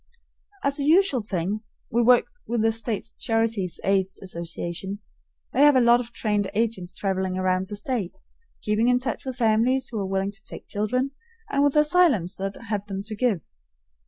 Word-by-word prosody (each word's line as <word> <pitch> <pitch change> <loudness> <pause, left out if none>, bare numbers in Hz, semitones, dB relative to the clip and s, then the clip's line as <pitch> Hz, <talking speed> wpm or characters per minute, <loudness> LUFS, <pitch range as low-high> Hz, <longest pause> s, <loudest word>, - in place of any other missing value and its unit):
As 280 +1 0
a - - 0
usual 315 -3 +4
thing, 200 0 -2 0.3
we 235 - +3
work 245 +1 +5 0.2
with 235 -2 0
the 225 - +4
State 225 -1 -2
Charities' 225 - 0
Aid 190 -1 +2 0.2
Association. 175 +2 -5 0.6
They - - +2
have 290 -1 +7
a - - +6
lot 240 0 +6
of 240 -1 -6
trained 210 -3 -1
agents 210 -5 -1
traveling 190 -2 -2
about 185 0 +1
the 205 - -6
State, 205 -3 -3 0.4
keeping 215 +2 +2
in 250 0 +4
touch 250 -1 -3
with 260 -1 -4
families 235 +3 +2
who 225 - -4
are 195 - -2
willing 195 +1 0
to 215 +1 -14
take - - -9
children, 250 +6 -1 0.4
and 280 - +2
with 285 0 +2
asylums 300 - +3
that 195 +1 -3
have 205 -1 -2
them 195 -1 -4
to 215 +1 -5
give. 210 -6 +1
220 Hz, 180 wpm, -25 LUFS, 195-250 Hz, 0.6 s, have